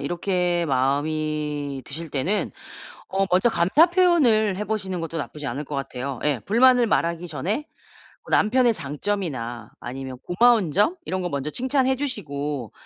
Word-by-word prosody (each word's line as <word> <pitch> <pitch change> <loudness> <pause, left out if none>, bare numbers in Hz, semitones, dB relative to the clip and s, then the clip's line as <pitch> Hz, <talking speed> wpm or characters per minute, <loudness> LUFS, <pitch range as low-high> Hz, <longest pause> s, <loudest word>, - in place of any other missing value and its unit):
이렇게 175 +2 0
마음이 145 +1 -1
드실 160 +2 -6
때는 165 +10 -1 0.6
어 195 +1 0
먼저 185 +6 +4
감사 210 - +4
표현을 270 - +3
해 210 - -3
보시는 195 -4 -3
것도 165 0 -4
나쁘지 150 -1 -5
않을 135 +5 -3
것 145 0 -6
같아요. 135 -1 -4
예. 145 -4 +1
불만을 245 +3 +5
말하기 170 -2 0
전에 175 - -2 0.6
뭐 - - -14
남편의 240 +2 +4
장점이나 145 - -4
아니면 130 +1 -6
고마운 220 -2 +3
점 210 - +2
이런 185 0 -2
거 180 - -2
먼저 140 -2 -3
칭찬해 260 - +1
주시고 145 - -4
170 Hz, 315 characters per minute, -24 LUFS, 140-215 Hz, 0.6 s, 불만을